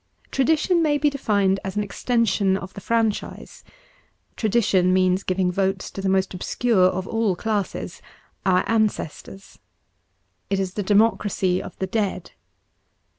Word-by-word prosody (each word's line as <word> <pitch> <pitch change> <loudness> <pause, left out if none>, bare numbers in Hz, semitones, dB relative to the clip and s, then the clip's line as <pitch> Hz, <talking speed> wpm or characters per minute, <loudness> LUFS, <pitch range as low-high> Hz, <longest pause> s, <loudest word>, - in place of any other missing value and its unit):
Tradition 320 +6 +2
may 300 -2 +2
be 295 0 +2
defined 200 -8 +1
as 190 0 -5
an 210 - 0
extension 205 -3 +1
of 190 -1 -9
the 200 - -9
franchise. 225 -1 -2 0.7
Tradition 200 -5 +2
means 185 0 +2
giving 185 -1 0
votes 190 0 -1
to 195 - -6
the 195 - 0
most 190 0 +1
obscure 190 +2 +1
of 185 0 -2
all 225 -4 0
classes 210 +1 -3 0.2
— - - -38
our 185 -1 +2
ancestors. 210 -3 -2 0.9
It 195 - 0
is 190 -1 -2
the 205 - -2
democracy 200 -2 +2
of - - -10
the 190 - -2
dead. 195 -2 -2
195 Hz, 140 wpm, -23 LUFS, 190-225 Hz, 0.9 s, Tradition